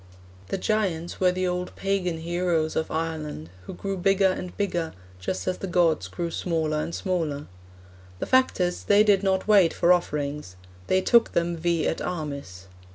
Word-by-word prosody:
"' 90 - -23
The - - -2
giants 185 -5 -1
were 185 -1 +4
the 185 +1 -1
old 180 0 -3
pagan 195 -4 -1
heroes 170 -1 -1
of 160 - -1
Ireland, 155 - -4 0.2
who - - -6
grew 195 -1 -4
bigger 195 +1 +3
and 180 -1 -6
bigger, 175 -5 -1 0.3
just 95 - -4
as 185 - -1
the 195 - -4
gods 170 -3 +2
grew 170 -1 -4
smaller 160 -3 -1
and 170 - -4
smaller. 160 -6 -2 0.7
The - - -3
fact 260 -4 +3
is 180 -1 -1
they 205 +1 +6
did 205 -3 +4
not 190 -1 0
wait 200 -6 +5
for 175 - +5
offerings; 150 - -2 0.3
they 185 - +3
took 235 +4 +4
them 170 0 +1
vi 170 0 0
et - - -1
armis. 140 - -5
175 Hz, 175 wpm, -25 LUFS, 160-190 Hz, 0.7 s, they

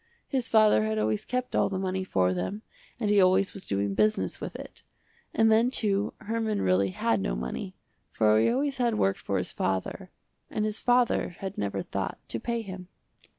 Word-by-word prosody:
His 260 -4 -1
father 215 - +5
had 110 0 -1
always 105 0 0
kept 250 0 -2
all - - +3
the 195 - -3
money 190 0 -2
for 95 - +1
them 95 - -4 0.4
and 210 -3 0
he 205 -1 +5
always 190 +1 +3
was 195 - -7
doing 100 0 0
business 215 - +1
with - - -6
it. - - -10 0.5
And 225 0 +3
then 225 +3 +4
too 205 -5 0
Herman 220 -1 -1
really 95 +1 +3
had 110 +2 0
no - - -1
money, 65 - -5 0.4
for 110 -1 +3
he - - +3
always 275 +3 0
had 240 -3 +1
worked 95 0 +1
for 100 - -2
his 90 - -2
father, 95 -1 -2 0.4
and 215 - -1
his 215 0 -2
father 245 -7 +2
had 195 0 -5
never 100 -1 -2
thought - - -4
to 115 - -2
pay 235 - -2
him. 185 -3 -8
190 Hz, 195 wpm, -28 LUFS, -, 0.5 s, father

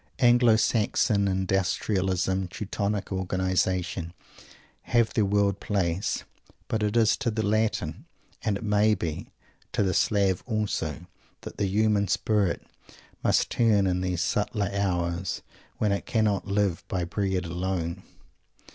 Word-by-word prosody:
Anglo 120 -3 +5
Saxon 105 -2 +2
Industrialism, 95 0 0
Teutonic 100 +2 -3
Organization, 95 -2 -1 0.7
have 120 -2 +1
their 110 - +2
world 100 0 +1
place; 95 -1 -1 0.4
but 110 - -1
it 105 +2 0
is 110 -2 +4
to 135 -4 -1
the 110 -1 -1
Latin, 110 +1 0 0.4
and, 105 -2 0
it - - -9
may 105 0 +3
be, 80 -5 -4 0.4
to - - +2
the 95 -1 +1
Slav 100 -3 +2
also, 100 - -2 0.4
that - - -9
the 100 - +1
human 105 +1 +2
spirit 105 -5 0 0.6
must - - +2
turn 110 -4 +3
in 90 -1 0
those 90 -2 -1
subtler 105 +1 0
hours 90 -2 -1 0.3
when 105 - +1
it 100 - -2
cannot 105 -4 +1
"live 100 -3 0
by 90 -2 -1
bread 95 +1 -1
alone." 90 0 -3
100 Hz, 130 wpm, -27 LUFS, 95-105 Hz, 0.7 s, Anglo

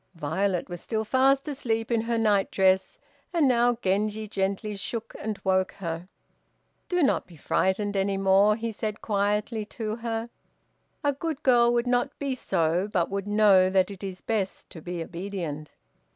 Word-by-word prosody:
Violet 175 +4 -1
was 175 -2 -7
still 220 -1 -2
fast 270 +4 +3
asleep 230 -5 -2
in 230 -1 +2
her 230 +1 -1
night 210 -3 +2
dress, 190 -1 +2 0.3
and 335 -5 +3
now 240 -1 +3
Genji 210 +3 0
gently 200 +1 -2
shook 225 +3 -5
and 215 -1 -4
woke 190 -1 +1
her. 170 -1 -5 0.8
"Do 355 -2 +2
not 270 - +2
be 175 - -15
frightened 195 +6 0
any 195 0 +1
more," 195 +2 +4
he 230 +1 -3
said 215 0 -4
quietly 210 +2 0
to 220 -2 -2
her; 230 0 -4 0.7
"a 285 -1 +2
good 305 +1 -4
girl 240 -2 +5
would 240 0 +1
not 245 +3 0
be 280 -2 -2
so, 180 -4 0
but 175 -2 0
would 200 0 -3
know 205 -3 +5
that 190 +1 +2
it 200 0 -10
is 190 -2 -6
best 210 -4 -3
to 165 - -10
be 175 0 -4
obedient." 170 -4 -5
205 Hz, 165 wpm, -26 LUFS, 190-230 Hz, 0.8 s, girl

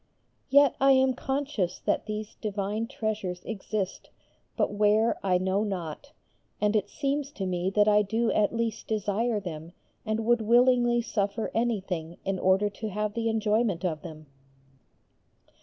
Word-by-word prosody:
Yet 280 0 +5
I 270 0 +6
am 260 0 +4
conscious 265 -8 -2
that - - -1
these 215 0 -5
divine 210 +1 -2
treasures 215 -7 -3
exist, 205 -2 -4 0.5
but - - +1
where 210 +2 +3
I 185 -2 +3
know 190 +3 0
not, 190 - -5 0.5
and 210 +1 +1
it 205 -1 +1
seems 280 -1 -2
to 195 - -4
me 180 0 -1
that 210 0 +4
I 210 0 +5
do 225 +3 0
at 210 -1 +2
least 230 -1 -3
desire 215 +1 0
them 165 -3 -7 0.3
and 220 +1 -2
would 240 0 +3
willingly 240 +1 +4
suffer 205 0 -2
anything 190 -8 -2
in 195 -1 -1
order 190 +3 +3
to 215 +2 -5
have 210 +1 -2
the 230 0 -1
enjoyment 215 -4 +1
of 155 -4 -2
them. 155 -2 -10
210 Hz, 150 wpm, -27 LUFS, 195-230 Hz, 0.5 s, I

